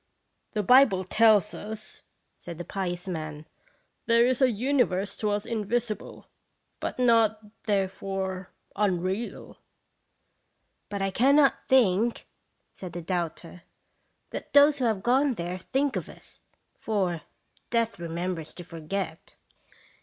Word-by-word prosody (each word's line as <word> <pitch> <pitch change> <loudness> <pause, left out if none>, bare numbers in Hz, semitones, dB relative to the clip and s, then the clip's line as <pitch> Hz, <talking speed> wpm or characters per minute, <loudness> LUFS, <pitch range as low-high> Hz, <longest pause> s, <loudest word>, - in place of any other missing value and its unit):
"The 210 -2 0
Bible 250 -5 +5
tells 215 0 +4
us," 215 0 -8 0.3
said 170 -2 -9
the 175 - -5
pious 180 -1 -4
man, 155 -3 -5 0.2
" - - -35
' - - -48
There 235 0 +5
is 255 +1 +1
a 260 - +6
universe 220 -5 0
to 210 - -1
us 205 0 -1
invisible, 230 0 -3 0.5
but - - -4
not, 220 -3 +2
therefore, 195 -2 -2 0.3
unreal."' 190 +2 -2 1.3
"But 200 -1 -3
I 195 - 0
cannot 275 +6 +3
think," 230 -3 +3 0.5
said 180 -3 -9
the 175 0 -6
doubter, 175 0 -4 0.7
"that - - -7
those 285 0 +6
who 255 - +1
have 215 -4 0
gone 260 +2 +3
there 175 +1 -4
think 270 +8 -1
of - - -4
us; - - -13 0.3
for 185 -7 -1 0.2
' - - -38
Death 230 -4 0
remembers 170 -1 -4
to 175 - -8
forget.' 165 0 -5
205 Hz, 130 wpm, -27 LUFS, 180-235 Hz, 1.3 s, a